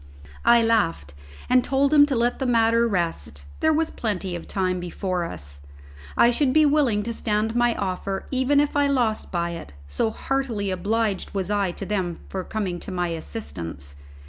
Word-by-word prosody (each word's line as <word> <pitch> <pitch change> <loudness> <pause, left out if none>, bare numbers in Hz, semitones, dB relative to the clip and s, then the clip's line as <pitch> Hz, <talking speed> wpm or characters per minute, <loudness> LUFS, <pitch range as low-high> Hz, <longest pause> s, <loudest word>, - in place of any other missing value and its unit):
I 235 0 +6
laughed, 180 - +1 0.3
and 250 0 +4
told 275 +2 +2
him 290 -1 +7
to 275 - -1
let 240 +1 +1
the 265 - -1
matter 230 0 +3
rest, 75 - -2
there 315 - +3
was 320 +1 +1
plenty 195 -5 -3
of 170 - -7
time 185 -2 -1
before 180 0 -2
us; 70 - -8 0.6
I 235 - +6
should 255 +1 +1
be 310 0 +5
willing 280 -8 +2
to 230 +2 -3
stand 215 0 0
to 235 - -3
my 240 -1 +3
offer 195 0 -3
even 260 +2 +3
if 290 0 +1
I 285 0 +3
lost 245 -6 0
by 170 -1 -1
it, 165 - -8
so 70 - 0
heartily 230 -5 -2
obliged 205 +2 -1
was 190 0 -1
I 200 -3 +1
to 195 - -6
them 185 -4 -2
for 190 -1 -4
coming 190 -5 -3
to - - -7
my 180 -1 -1
assistance. 85 - -6
210 Hz, 185 wpm, -24 LUFS, 180-245 Hz, 0.6 s, him